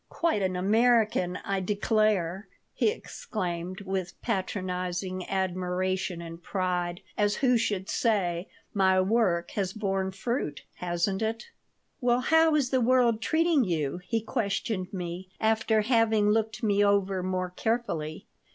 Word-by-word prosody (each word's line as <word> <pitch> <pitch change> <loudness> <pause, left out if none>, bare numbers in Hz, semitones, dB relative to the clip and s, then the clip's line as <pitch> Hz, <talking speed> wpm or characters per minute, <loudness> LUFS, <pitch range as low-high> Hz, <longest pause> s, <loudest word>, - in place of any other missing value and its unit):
"Quite 335 -11 0
an 185 -1 0
American, 215 -2 +2
I 195 -1 0
declare," 205 -2 +1 0.3
he - - +2
exclaimed, 185 - -4
with 190 -2 -4
patronizing 185 -3 -2
admiration 185 -1 -1
and 165 0 -9
pride, 180 -1 -2 0.2
as 205 0 +3
who 255 -2 +3
should 205 -5 0
say, 185 -6 0 0.2
"My 190 -2 +4
work 185 -3 +1
has 195 -2 -2
borne 195 -3 -1
fruit, 195 - -3
hasn't 180 +3 -1
it?" 225 - -3 0.5
"Well, 245 -1 +2
how 320 +2 +4
is 275 -4 +1
the 260 -1 +2
world 240 -2 +3
treating 320 0 +3
you?" 165 -4 -1
he 225 +5 -1
questioned 200 -3 -2
me, 180 0 -5
after 220 0 +2
having 220 -2 +3
looked 220 0 0
me 205 -1 +3
over 200 -2 +2
more 185 0 -2
carefully. 180 -8 -2
195 Hz, 130 wpm, -28 LUFS, 180-225 Hz, 0.5 s, My